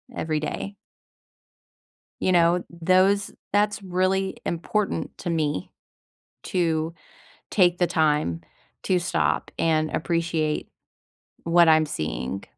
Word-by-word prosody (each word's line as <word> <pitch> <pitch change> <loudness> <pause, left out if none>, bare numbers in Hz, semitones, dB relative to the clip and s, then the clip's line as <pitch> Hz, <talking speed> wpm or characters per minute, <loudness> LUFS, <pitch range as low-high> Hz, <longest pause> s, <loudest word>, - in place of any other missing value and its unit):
every 155 -1 -1
day. 195 +6 -4 1.5
You 185 - +2
know, 175 0 +3
those 185 +4 +2 0.2
that's 210 0 +1
really 190 +1 0
important 195 +5 -2
to 175 - -4
me 150 - -1 0.7
to 165 -2 0 0.6
take 175 -3 +3
the 175 - +3
time 150 - +1 0.4
to 185 -1 +2
stop 175 - 0
and 155 -1 +1
appreciate 165 -2 -1 0.8
what 170 0 +5
I'm 155 -1 +5
seeing. 75 - -4
170 Hz, 100 wpm, -24 LUFS, 155-185 Hz, 1.5 s, what